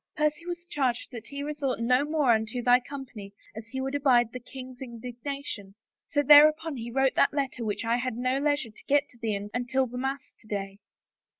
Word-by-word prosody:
Percy 300 +3 0
was 345 0 -5
charged 265 -7 -1
that 235 -4 -8
he 280 0 -5
resort 290 -4 -2
no 250 +3 +3
more 295 -4 +2
unto 220 +2 0
thy 245 0 +6
company 250 -7 -9 0.2
as 220 +1 -8
he 265 +3 -5
would 265 +1 -3
abide 250 -5 +3
the 250 - -5
king's 255 +1 -10
indignation... 240 -3 -6 0.3
so 290 0 +1
thereupon 305 +2 +7
he 235 0 -5
wrote 265 +2 +2
that 280 - +3
letter 270 -4 -2
which 215 +1 -2
I 230 +1 +2
had 250 -1 -2
no 255 +2 0
leisure 290 -4 0
to 215 - -17
get 285 0 +3
to 245 - -21
thee 225 -3 -1 0.2
until 250 +2 0
the 250 0 -6
mass 270 +1 -3
to 215 - -21
day." 195 -1 -4
255 Hz, 200 wpm, -28 LUFS, 235-285 Hz, 0.3 s, thereupon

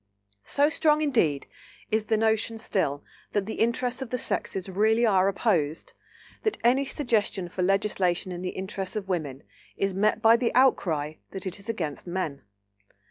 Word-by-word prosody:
So 285 +1 +3
strong 305 0 +3
indeed 175 - +1 0.5
is 215 0 +1
the 220 -1 +1
notion 220 +1 +1
still 145 -10 -1 0.3
that 205 -2 +1
the 220 - -5
interests 245 +2 0
of 265 - -4
the 250 - -1
sexes 190 -5 -2
really 220 +5 +2
are 195 -3 +4
opposed, 175 -7 0 0.5
that 435 - -1
any 260 +4 +4
suggestion 220 -9 -1
for 180 - -4
legislation 190 -1 +1
in 175 0 -5
the 180 - -2
interests 190 0 -5
of 205 -3 -3
women 150 -8 -3 0.3
is 195 -1 0
met 210 +3 +2
by 225 +1 +6
the 235 -1 0
outcry 160 - +2 0.2
that 190 - -5
it 185 +1 -4
is 200 - -10
against 170 -8 -4
men. 175 -6 -3
200 Hz, 165 wpm, -27 LUFS, 180-230 Hz, 0.5 s, by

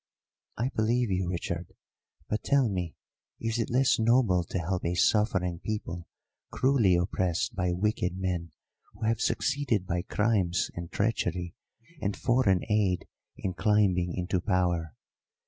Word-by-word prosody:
"I 120 +4 0
believe 115 +1 +1
you, 90 -1 0
Richard. 85 -1 -4 0.5
But 105 - -2
tell 140 -3 +3
me, 90 -5 -3 0.4
is 115 +1 -1
it 115 - -1
less 130 0 +3
noble 110 -6 +3
to - - -4
help 90 +1 -2
a 85 +1 0
suffering 95 -3 +2
people 85 -6 -4 0.4
cruelly 130 -9 +3
oppressed 90 +4 0
by 90 -2 0
wicked 90 -1 0
men 90 -3 -2 0.4
who 105 +3 -10
have 115 0 +1
succeeded 140 -9 0
by 85 -1 -1
crimes 100 -3 +1
and 85 -1 -7
treachery 90 -5 -1 0.5
and 100 -1 -1
foreign 110 -8 +2
aid 100 -5 +1 0.3
in 95 - -3
climbing 90 -3 +2
into 90 0 -1
power? 85 - 0
95 Hz, 135 wpm, -29 LUFS, 90-110 Hz, 0.5 s, tell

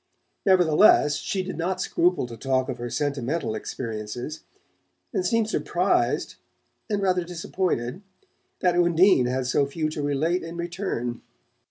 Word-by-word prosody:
Nevertheless 175 -4 +5
she 190 -1 -2
did 185 - -6
not 185 +2 -1
scruple 180 -4 +1
to 120 -1 -8
talk 130 +3 0
of 125 - -4
her 120 0 -4
sentimental 140 -1 -2
experiences, 115 +5 -5 0.7
and 375 - 0
seemed 230 -8 +1
surprised, 220 - 0 0.5
and 205 -2 0
rather 185 -2 +2
disappointed, 175 -4 -2 0.6
that 180 -2 +3
Undine 175 -5 +4
had 130 +1 -1
so 140 +3 +2
few 155 +2 -2
to 155 -1 -4
relate 145 +5 0
in 165 +1 -7
return. 170 - -3
160 Hz, 135 wpm, -25 LUFS, 130-180 Hz, 0.7 s, Nevertheless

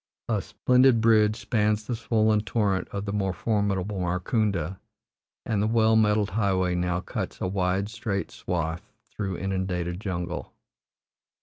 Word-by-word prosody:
A 110 -4 0
splendid 125 +4 +3
bridge 110 -2 +4
spans 105 -1 0
the 120 - -2
swollen 110 -1 +2
torrent 105 -4 0
of 100 0 -4
the 100 - -3
more 95 -2 0
formidable 100 0 -1
Markunda, 90 - -1 0.7
and 110 -4 0
the 105 - +2
well 110 0 +3
metalled 105 -2 +3
highway 95 -3 +1
now 90 0 0
cuts - - -5
a - - -2
wide 95 +1 0
straight 110 -3 -3
swath 85 -1 -3 0.3
through 95 -4 -3
inundated 90 -2 -2
jungle. 90 -4 -4
100 Hz, 135 wpm, -26 LUFS, 90-110 Hz, 0.7 s, bridge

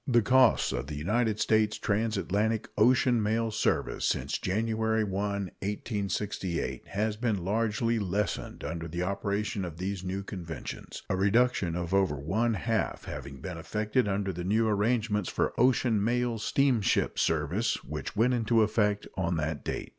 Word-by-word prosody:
The 120 -3 +4
cost 125 - +4
of 65 +1 -3
the 75 - -5
United 105 +7 0
States 110 0 +2
transatlantic 110 0 0
ocean 120 +1 +4
mail 110 +2 0
service - - 0
since - - 0
January 110 +2 0
1, 100 - -3
1868, 100 -1 -3
has 105 +2 -1
been 105 -6 -1
largely 115 +3 +1
lessened 100 +1 -2
under 80 +2 -4
the 85 +2 -3
operation 100 +2 -2
of 85 -3 -6
these 95 +1 -3
new 95 +1 -3
conventions, 85 - -7
a - - 0
reduction 100 -2 +2
of 90 +1 -3
over 95 -6 +3
one 105 +12 0
half 85 - -1
having 70 -1 -7
been 90 -3 -6
effected 105 +7 0
under 100 -1 -1
the 90 +1 -5
new 110 +5 +2
arrangements 105 -1 +1
for - - 0
ocean 120 -4 +3
mail 120 0 0
steamship 125 -1 +2
service 85 +9 0
which 75 +7 -6
went 120 +4 +3
into 115 -1 +3
effect 105 -1 +1
on 85 -2 0
that 80 -1 -2
date. - - -4
105 Hz, 150 wpm, -29 LUFS, 95-115 Hz, -, The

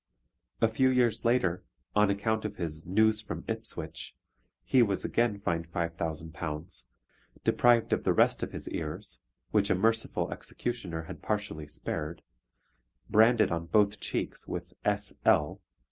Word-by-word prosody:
A 115 - +6
few 130 +4 +3
years 120 -4 +2
later, 115 -8 +2 0.3
on 105 -1 +5
account 110 +2 0
of 105 - -4
his 80 -2 -5
News 110 +3 +3
from 110 - -6
Ipswich, - - -5 0.5
he 130 - +4
was 100 -5 +1
again 115 -4 +1
fined 85 -3 -2
£5,000, 80 -4 -3 0.6
deprived 120 -2 +4
of - - 0
the - - +3
rest - - +3
of - - -3
his - - -7
ears, 80 +6 -5 0.3
which 100 -2 +3
a - - +4
merciful 115 +4 +1
executioner 90 -10 -4
had 80 - -9
partially 100 -8 -3
spared, 75 +2 -5 0.9
branded 110 0 +5
on 85 0 -2
both 105 +1 +3
cheeks - - -3
with 90 +1 -5
S.L. 100 -7 +1
100 Hz, 135 wpm, -30 LUFS, 85-110 Hz, 0.9 s, A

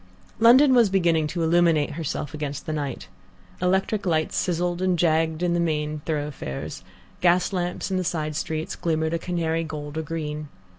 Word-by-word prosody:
London 260 +5 +7
was 235 -4 +5
beginning 170 -5 +2
to 170 +2 -2
illuminate 165 -2 +3
herself 150 -2 -4
against 145 -1 -4
the 155 - -3
night. 145 -4 -4 0.5
Electric 190 +3 +1
lights 160 -2 +1
sizzled 175 0 0
and 185 -1 +2
jagged 160 0 +1
in 175 -1 +2
the 175 - +1
main 155 -2 -1
thoroughfares, 145 - -4 0.4
gas 180 +2 +3
lamps 180 +1 -2
in 190 - +1
the 185 - 0
side 155 -3 -2
streets 160 0 -3
glimmered 160 -1 -1
a 170 - 0
canary 165 -2 -1
gold 150 -1 -5
or - - 0
green. 150 -1 -5
165 Hz, 165 wpm, -24 LUFS, 155-175 Hz, 0.5 s, London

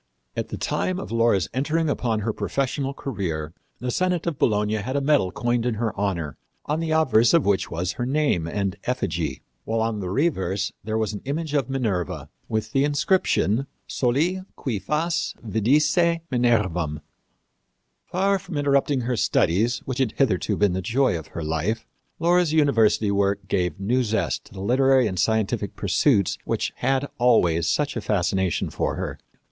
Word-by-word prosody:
At - - -3
the - - -5
time 185 - -1
of - - -7
Laura's 115 -5 +2
entering 155 +5 0
upon 115 -6 0
her 110 +1 -1
professional 135 +2 -2
career 90 - -4 0.2
the 125 +1 -3
senate 180 +3 0
of 170 -5 -2
Bologna 105 -1 +2
had 125 +6 -3
a - - +3
medal 140 -10 +2
coined 120 +3 0
in 120 -2 0
her 110 0 -2
honor, 90 -7 -2 0.3
on 150 +2 -1
the 165 -1 -2
obverse 145 -6 +4
of 165 - +3
which 100 -1 +1
was 90 +3 -2
her 120 - -3
name 135 - +1
and 100 +1 -2
effigy, 85 - -2 0.2
while 115 +1 -1
on 110 -1 -1
the 95 -3 -4
reverse 100 - 0
there 110 +1 -2
was 110 -1 -1
an 100 - -6
image 150 +2 -3
of 140 -4 +1
Minerva, 110 - -2 0.2
with 110 0 -2
the 135 +2 +2
inscription, 145 - +1 0.2
Soli 155 +10 0
cui 120 -8 -3
fas 155 - -1
vidisse 150 - +3
Minervam. 95 - +1 1.1
Far 195 +2 +1
from 165 - -6
interrupting 140 -1 +2
her 125 +1 -1
studies, 115 +3 +1
which 130 0 -3
had 125 -4 +1
hitherto 110 -10 +1
been 105 -3 +3
the 95 - -1
joy 120 +3 +1
of 80 -2 -6
her 85 - -6
life, 80 +9 -1 0.3
Laura's 175 -1 +3
university 115 -9 +3
work 100 -1 0
gave 90 -4 -1
new 120 +6 +1
zest 110 -1 -1
to - - -16
the 95 - -7
literary 130 +4 +4
and 95 -4 -2
scientific 110 -1 0
pursuits 100 - +2
which - - -2
had 135 +1 +1
always 90 -10 +3
such 145 -1 0
a 115 - -2
fascination 95 -3 0
for - - -1
her. - - -4
115 Hz, 170 wpm, -24 LUFS, 100-140 Hz, 1.1 s, obverse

